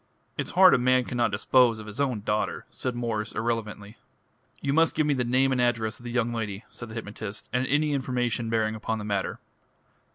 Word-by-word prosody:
"It's -, -, -3 dB
hard 185 Hz, -1 st, +9 dB
a -, -, +4 dB
man 130 Hz, +1 st, +3 dB
cannot 120 Hz, -2 st, 0 dB
dispose 125 Hz, -2 st, +3 dB
of 110 Hz, -, -9 dB
his 105 Hz, +6 st, -5 dB
own 125 Hz, -7 st, 0 dB
daughter," 105 Hz, +1 st, -1 dB
said 125 Hz, -2 st, -4 dB
Mwres 110 Hz, -3 st, -3 dB
irrelevantly. 110 Hz, -2 st, -3 dB, 0.6 s
"You 140 Hz, -, -1 dB
must 165 Hz, +2 st, +3 dB
give 155 Hz, -, +2 dB
me 150 Hz, -, +2 dB
the 130 Hz, -2 st, 0 dB
name 130 Hz, +3 st, +2 dB
and 130 Hz, -1 st, +1 dB
address 115 Hz, -2 st, 0 dB
of 120 Hz, -, -14 dB
the 120 Hz, -, -4 dB
young 120 Hz, -1 st, 0 dB
lady," 105 Hz, -2 st, -4 dB
said 120 Hz, -, -9 dB
the 110 Hz, -, -9 dB
hypnotist, 105 Hz, -2 st, -6 dB
"and 125 Hz, +1 st, +1 dB
any 150 Hz, +1 st, +2 dB
information 125 Hz, -4 st, -1 dB
bearing 110 Hz, -1 st, +1 dB
upon 110 Hz, +1 st, -3 dB
the 105 Hz, -, -6 dB
matter. 100 Hz, -2 st, -2 dB
120 Hz, 205 wpm, -27 LUFS, 110-130 Hz, 0.6 s, hard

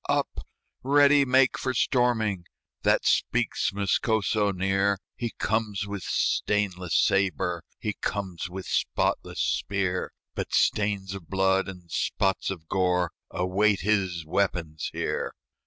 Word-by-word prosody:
"Up! -, -, -1 dB, 0.3 s
ready 145 Hz, +1 st, +5 dB
make 130 Hz, 0 st, +3 dB
for 130 Hz, -1 st, -2 dB
storming!" 110 Hz, -8 st, +1 dB, 0.4 s
That -, -, +2 dB
speaks -, -, +1 dB
Moscoso 105 Hz, +1 st, +1 dB
near; 95 Hz, +1 st, +1 dB, 0.2 s
He 120 Hz, -, -3 dB
comes 105 Hz, -2 st, -1 dB
with 100 Hz, -1 st, -5 dB
stainless 95 Hz, -4 st, 0 dB
sabre, 95 Hz, -3 st, +1 dB, 0.2 s
He 105 Hz, -, -3 dB
comes 95 Hz, -4 st, -3 dB
with 95 Hz, +1 st, -7 dB
spotless -, -, -1 dB
spear; 95 Hz, -2 st, -1 dB, 0.2 s
But -, -, -3 dB
stains 100 Hz, -2 st, +1 dB
of 95 Hz, -5 st, -9 dB
blood 95 Hz, 0 st, +2 dB
and 90 Hz, -3 st, -10 dB
spots 95 Hz, +3 st, 0 dB
of 85 Hz, -4 st, -6 dB
gore 90 Hz, -2 st, +1 dB, 0.2 s
Await 95 Hz, +3 st, +1 dB
his 95 Hz, -5 st, 0 dB
weapons 85 Hz, -3 st, -1 dB
here. -, -, -3 dB
95 Hz, 120 wpm, -27 LUFS, 90-105 Hz, 0.4 s, ready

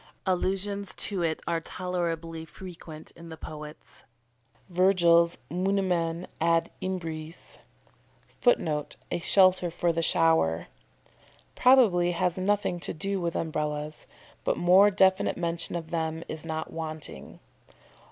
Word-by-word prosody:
Allusions 195 Hz, +2 st, -1 dB
to 195 Hz, -4 st, -3 dB
it 160 Hz, -2 st, -1 dB
are 170 Hz, -1 st, -1 dB
tolerably 165 Hz, -2 st, -3 dB
frequent 160 Hz, -2 st, -11 dB
in 170 Hz, 0 st, -13 dB
the 160 Hz, -, -8 dB
poets. 150 Hz, 0 st, -10 dB, 0.6 s
Virgil's 175 Hz, -2 st, +4 dB
"Munimen 180 Hz, -2 st, 0 dB, 0.2 s
ad 165 Hz, 0 st, +2 dB
imbres" 165 Hz, -3 st, -5 dB, 0.8 s
[Footnote: 155 Hz, -, +1 dB, 0.2 s
"A -, -, 0 dB
shelter 185 Hz, 0 st, +4 dB
for 170 Hz, 0 st, 0 dB
the 165 Hz, -, 0 dB
shower."] 160 Hz, -, +2 dB, 0.8 s
probably 210 Hz, -10 st, +5 dB
has 180 Hz, 0 st, 0 dB
nothing 195 Hz, -2 st, 0 dB
to -, -, -4 dB
do 195 Hz, +4 st, -2 dB
with 170 Hz, -1 st, -2 dB
Umbrellas, 150 Hz, -1 st, -3 dB, 0.4 s
but -, -, 0 dB
more 185 Hz, +4 st, +6 dB
definite 190 Hz, -1 st, +3 dB
mention 170 Hz, -1 st, -1 dB
of 165 Hz, -2 st, -5 dB
them 160 Hz, -1 st, -2 dB
is 155 Hz, 0 st, -4 dB
not 160 Hz, -1 st, -4 dB
wanting. 155 Hz, -, -7 dB
170 Hz, 115 wpm, -27 LUFS, 160-185 Hz, 0.8 s, more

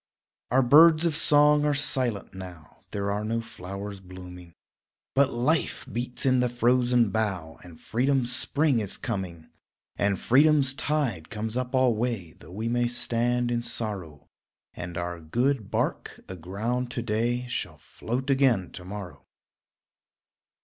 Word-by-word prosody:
Our 130 Hz, +1 st, +4 dB
birds 155 Hz, +5 st, +7 dB
of 165 Hz, -3 st, +1 dB
song 150 Hz, -1 st, +5 dB
are 150 Hz, -1 st, +2 dB
silent 130 Hz, -7 st, 0 dB
now, 90 Hz, -4 st, -11 dB
There 100 Hz, 0 st, -2 dB
are 105 Hz, +1 st, -2 dB
no 115 Hz, +2 st, -1 dB
flowers 100 Hz, -1 st, -7 dB
blooming, 90 Hz, -2 st, -11 dB, 0.6 s
But 140 Hz, 0 st, +3 dB
life 130 Hz, +7 st, 0 dB
beats 120 Hz, +2 st, -4 dB
in 130 Hz, -1 st, +4 dB
the 125 Hz, 0 st, +2 dB
frozen 120 Hz, -1 st, +2 dB
bough 95 Hz, -8 st, -2 dB
And 85 Hz, -3 st, -13 dB
freedom's 125 Hz, 0 st, 0 dB
spring 140 Hz, 0 st, +1 dB
is 105 Hz, -2 st, -4 dB
coming. 95 Hz, -, -5 dB, 0.5 s
And 100 Hz, -2 st, +1 dB
freedom's 140 Hz, +1 st, +4 dB
tide 135 Hz, -, -1 dB
comes 110 Hz, 0 st, -4 dB
up 125 Hz, +1 st, -2 dB
alway 120 Hz, -7 st, +1 dB
Though 75 Hz, -, -16 dB
we 105 Hz, +6 st, -4 dB
may 120 Hz, +1 st, +1 dB
stand 120 Hz, 0 st, 0 dB
in 120 Hz, 0 st, 0 dB
sorrow; 105 Hz, -10 st, -5 dB, 0.5 s
And 85 Hz, -1 st, -7 dB
our 85 Hz, 0 st, -4 dB
good 120 Hz, -, -1 dB
bark, -, -, -2 dB
aground 100 Hz, +8 st, -3 dB
to 120 Hz, -, -3 dB
day, 120 Hz, +3 st, -1 dB
Shall 125 Hz, -, -4 dB
float 130 Hz, +4 st, -4 dB
again 130 Hz, -9 st, +2 dB
to 90 Hz, -, -9 dB
morrow. 95 Hz, -1 st, -8 dB
120 Hz, 140 wpm, -26 LUFS, 95-130 Hz, 0.6 s, birds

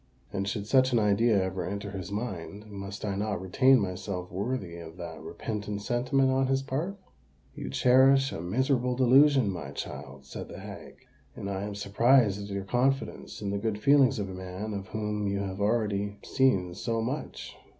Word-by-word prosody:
And 100 Hz, 0 st, -2 dB
should 100 Hz, 0 st, -2 dB
such 130 Hz, +2 st, +4 dB
an -, -, +4 dB
idea 105 Hz, 0 st, +3 dB
ever 95 Hz, 0 st, -3 dB
enter 100 Hz, +1 st, -4 dB
his 95 Hz, -1 st, -6 dB
mind, 100 Hz, -2 st, -5 dB
must 100 Hz, +1 st, -6 dB
I 100 Hz, -2 st, -1 dB
not 105 Hz, -1 st, -1 dB
retain 130 Hz, +8 st, +4 dB
myself 90 Hz, -1 st, -4 dB
worthy 95 Hz, -2 st, -3 dB
of 80 Hz, 0 st, -10 dB
that 85 Hz, -2 st, -7 dB
repentant 105 Hz, -2 st, -5 dB
sentiment 130 Hz, +4 st, +2 dB
on 130 Hz, 0 st, +2 dB
his 135 Hz, 0 st, +1 dB
part?" 155 Hz, +9 st, -3 dB, 0.6 s
"You -, -, -6 dB
cherish 135 Hz, -, +5 dB
a -, -, -5 dB
miserable 125 Hz, +6 st, +1 dB
delusion, 130 Hz, -2 st, +5 dB
my 80 Hz, -7 st, -6 dB
child," 65 Hz, -1 st, -7 dB
said 65 Hz, -, -7 dB
the -, -, -9 dB
hag; -, -, -10 dB, 0.3 s
"and -, -, -6 dB
I 95 Hz, -1 st, -3 dB
am 100 Hz, 0 st, -4 dB
surprised 105 Hz, +1 st, +3 dB
at 100 Hz, -, -7 dB
your 100 Hz, -1 st, -3 dB
confidence 125 Hz, +2 st, -1 dB
in 100 Hz, -, -1 dB
the 100 Hz, -, -1 dB
good 110 Hz, 0 st, -1 dB
feelings 135 Hz, +1 st, +5 dB
of 100 Hz, -2 st, -2 dB
a 95 Hz, -, -7 dB
man 95 Hz, +3 st, -5 dB
of 100 Hz, -1 st, -5 dB
whom 105 Hz, -1 st, -2 dB
you 100 Hz, 0 st, 0 dB
have 95 Hz, 0 st, -4 dB
already 105 Hz, -2 st, 0 dB
seen 100 Hz, -10 st, +2 dB
so 115 Hz, +4 st, -2 dB
much." 130 Hz, +6 st, -5 dB
105 Hz, 180 wpm, -29 LUFS, 95-125 Hz, 0.6 s, cherish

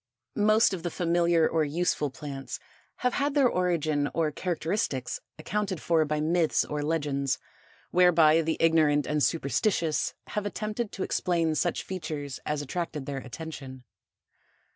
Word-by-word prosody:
Most 215 Hz, 0 st, +4 dB
of 180 Hz, -, -4 dB
the 175 Hz, -, -2 dB
familiar 170 Hz, -1 st, +2 dB
or 160 Hz, -1 st, +1 dB
useful 150 Hz, -1 st, 0 dB
plants 135 Hz, 0 st, -7 dB, 0.5 s
have 250 Hz, -, +3 dB
had 285 Hz, +1 st, 0 dB
their 280 Hz, -3 st, +5 dB
origin 160 Hz, -7 st, +1 dB
or 160 Hz, -2 st, +1 dB
characteristics 165 Hz, -5 st, -2 dB, 0.2 s
accounted 190 Hz, +2 st, -2 dB
for 165 Hz, 0 st, +2 dB
by 150 Hz, 0 st, -1 dB
myths 160 Hz, +1 st, +2 dB
or 150 Hz, 0 st, -3 dB
legends, 145 Hz, -3 st, 0 dB, 0.5 s
whereby 165 Hz, -3 st, +5 dB
the 160 Hz, 0 st, -1 dB
ignorant 155 Hz, -3 st, +4 dB
and 150 Hz, 0 st, 0 dB
superstitious 165 Hz, +2 st, +1 dB
have 210 Hz, -1 st, -2 dB
attempted 215 Hz, +2 st, -3 dB
to 190 Hz, -, -3 dB
explain 170 Hz, -3 st, +1 dB
such 175 Hz, +3 st, 0 dB
features 155 Hz, -6 st, -5 dB
as 150 Hz, -1 st, -1 dB
attracted 150 Hz, -1 st, -4 dB
their 140 Hz, -1 st, -3 dB
attention. 135 Hz, -1 st, -8 dB
160 Hz, 140 wpm, -28 LUFS, 150-180 Hz, 0.5 s, their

